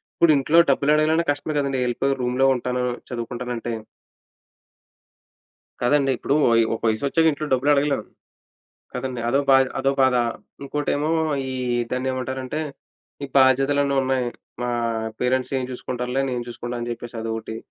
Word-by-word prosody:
ఇప్పుడు 170 Hz, -, +5 dB
ఇంట్లో 150 Hz, +4 st, +2 dB
డబ్బులు 140 Hz, +2 st, +3 dB
అడగాలంటే 160 Hz, +2 st, +2 dB
కష్టమే 145 Hz, +2 st, -3 dB
కదండీ 140 Hz, -1 st, -1 dB
వెళ్ళిపోయి 135 Hz, +3 st, 0 dB
రూమ్‌లో 125 Hz, +2 st, +1 dB
ఉంటాను, 125 Hz, 0 st, -2 dB, 0.3 s
చదువుకుంటాను 120 Hz, +1 st, -4 dB
అంటే. 115 Hz, +1 st, -4 dB, 2.1 s
కాదండి 135 Hz, +2 st, +3 dB
ఇప్పుడూ 140 Hz, -, 0 dB, 0.2 s
వయి 115 Hz, 0 st, +5 dB
ఒక 115 Hz, -, -6 dB
వయసొచ్చాక 140 Hz, +9 st, +1 dB
ఇంట్లో 150 Hz, +1 st, -4 dB
డబ్బులడగలేం, 140 Hz, +2 st, +2 dB, 0.9 s
కదండి? 125 Hz, -1 st, -4 dB
అదో 135 Hz, +4 st, +3 dB
భాయ్ 135 Hz, 0 st, +6 dB
అదో 135 Hz, +1 st, +2 dB
బాధ. 130 Hz, -1 st, +4 dB, 0.5 s
ఇంకోటేమో, 145 Hz, +2 st, -1 dB, 0.4 s
ఈ -, -, -3 dB, 0.4 s
దాన్నేమంటారంటే, 130 Hz, +2 st, -3 dB, 0.6 s
ఈ -, -, -4 dB
బాధ్యతలన్నీ 135 Hz, +2 st, +3 dB
ఉన్నాయి. 130 Hz, -1 st, 0 dB, 0.4 s
మా 125 Hz, -, -1 dB, 0.5 s
పేరెంట్సేం 130 Hz, +1 st, 0 dB
చూసుకుంటారులే, 125 Hz, +1 st, -3 dB
నేను 125 Hz, -1 st, -2 dB
చూసుకుంటాని 120 Hz, 0 st, -5 dB
చెప్పేసి 120 Hz, 0 st, -7 dB
అదోటి. 110 Hz, 0 st, -4 dB
130 Hz, 120 wpm, -23 LUFS, 125-140 Hz, 2.1 s, భాయ్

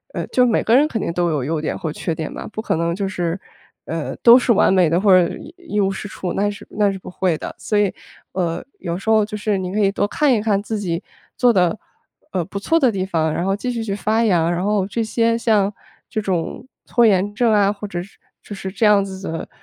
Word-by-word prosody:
呃， -, -, -2 dB
就 250 Hz, -, +3 dB
每 235 Hz, -, +2 dB
个 225 Hz, -, +3 dB
人 290 Hz, +4 st, +5 dB
肯 230 Hz, -, -3 dB
定 170 Hz, -, -2 dB
都 175 Hz, 0 st, +1 dB
有 150 Hz, -5 st, -1 dB
优 155 Hz, +3 st, -2 dB
点 155 Hz, -, -2 dB
或 160 Hz, -5 st, -4 dB
缺 165 Hz, -, -3 dB
点 160 Hz, -1 st, -5 dB
吧， -, -, -7 dB
不 215 Hz, -, -4 dB
可 -, -, 0 dB
能 170 Hz, +1 st, 0 dB
就 195 Hz, +1 st, -2 dB
是， 175 Hz, -2 st, -2 dB, 0.5 s
呃， 165 Hz, -1 st, -4 dB
都 240 Hz, +1 st, +9 dB
是 250 Hz, -, +1 dB
完 205 Hz, -3 st, +4 dB
美 180 Hz, -4 st, +4 dB
的 170 Hz, +2 st, +2 dB
或 200 Hz, 0 st, +3 dB
者 180 Hz, -2 st, +5 dB, 0.3 s
一 335 Hz, -12 st, -4 dB
无 195 Hz, -1 st, +2 dB
是 200 Hz, -, -6 dB
处， 185 Hz, -2 st, -5 dB
那 205 Hz, +1 st, +1 dB
是 205 Hz, -, -8 dB
那 205 Hz, -1 st, +2 dB
是 195 Hz, -, -5 dB
不 185 Hz, -, -10 dB
会 180 Hz, -3 st, 0 dB
的。 -, -, -7 dB
所 210 Hz, -, -1 dB
以， 205 Hz, -2 st, +2 dB, 0.4 s
呃， 175 Hz, -2 st, -2 dB, 0.2 s
有 170 Hz, -2 st, -3 dB
时 195 Hz, -, -11 dB
候 220 Hz, -1 st, +5 dB
就 210 Hz, 0 st, -5 dB
是 210 Hz, -1 st, -1 dB
您 185 Hz, -1 st, -4 dB
可 210 Hz, -, -1 dB
以 200 Hz, -2 st, +3 dB
多 205 Hz, -, 0 dB
看 290 Hz, +5 st, +2 dB
一 220 Hz, -, +1 dB
看 205 Hz, -2 st, +1 dB
自 215 Hz, 0 st, -3 dB
己 175 Hz, -2 st, -3 dB, 0.3 s
做 245 Hz, -2 st, +4 dB
得， 180 Hz, +1 st, +2 dB, 0.5 s
呃， 180 Hz, -, -1 dB
不 200 Hz, -, -7 dB
错 325 Hz, +11 st, +2 dB
的 260 Hz, -6 st, +4 dB
地 190 Hz, -3 st, -2 dB
方， 160 Hz, -4 st, 0 dB
然 170 Hz, +3 st, -2 dB
后 195 Hz, 0 st, +1 dB
继 250 Hz, +5 st, -3 dB
续 230 Hz, -2 st, -3 dB
去 205 Hz, -3 st, -3 dB
发 215 Hz, +3 st, +1 dB
扬， 170 Hz, -5 st, +2 dB
然 175 Hz, +1 st, -1 dB
后 205 Hz, -2 st, +1 dB
这 230 Hz, +3 st, -2 dB
些 230 Hz, +1 st, +1 dB
像 210 Hz, -4 st, +2 dB, 0.4 s
这 220 Hz, -, -2 dB
种 190 Hz, +4 st, -3 dB, 0.2 s
拖 240 Hz, -1 st, +3 dB
延 205 Hz, -1 st, +2 dB
症 230 Hz, 0 st, +3 dB
啊， 200 Hz, -1 st, +4 dB
或 210 Hz, 0 st, -6 dB
者 175 Hz, -3 st, -4 dB
是 195 Hz, +4 st, -14 dB, 0.2 s
就 205 Hz, -, -8 dB
是 190 Hz, -1 st, -6 dB
这 200 Hz, -, -3 dB
样 205 Hz, -2 st, +5 dB
子 190 Hz, -1 st, -8 dB
的， 165 Hz, -, -5 dB
200 Hz, 280 characters per minute, -20 LUFS, 180-215 Hz, 0.5 s, 都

